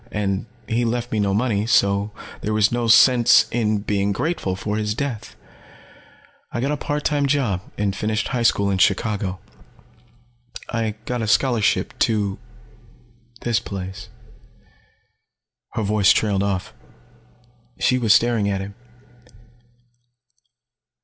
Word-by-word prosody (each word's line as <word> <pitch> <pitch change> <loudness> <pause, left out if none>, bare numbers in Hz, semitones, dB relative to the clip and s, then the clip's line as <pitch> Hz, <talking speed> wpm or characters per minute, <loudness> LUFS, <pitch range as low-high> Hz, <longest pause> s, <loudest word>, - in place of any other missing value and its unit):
And 100 0 -2 0.2
he 115 +2 0
left 120 +1 -2
me 110 - 0
no 100 -1 +1
money, 105 0 0
so 100 -3 +2 0.3
there 105 0 -2
was 105 -1 +3
no 120 -1 -1
sense 120 +1 +6
being 105 -3 -1
grateful 125 - -2
for 105 +2 -3
his 105 -1 -2
death. 130 -5 -5 1.2
I - - -3
got 135 +4 -1
a - - +1
part 145 +1 -3
time 145 -2 +1
job 130 -10 0 0.2
and 100 -1 -1
finished 110 0 -2
high 125 -2 -1
school 100 -3 +2
in 95 - -1
Chicago. 100 -2 +1 1.3
I 115 -2 -2
got 125 -1 -2
a 110 - -2
scholarship 110 +1 +1
to 100 -3 0 1.0
this 120 -1 +1
place." 95 0 -7 1.6
Her 110 - -2
voice 105 -2 +3
trailed 100 -3 +1
off. 100 -2 -2 1.1
She 125 - +2
was 115 -4 +2
staring 115 -3 +3
at 100 -1 -1
him. 100 +1 -7
105 Hz, 125 wpm, -22 LUFS, 100-120 Hz, 1.6 s, sense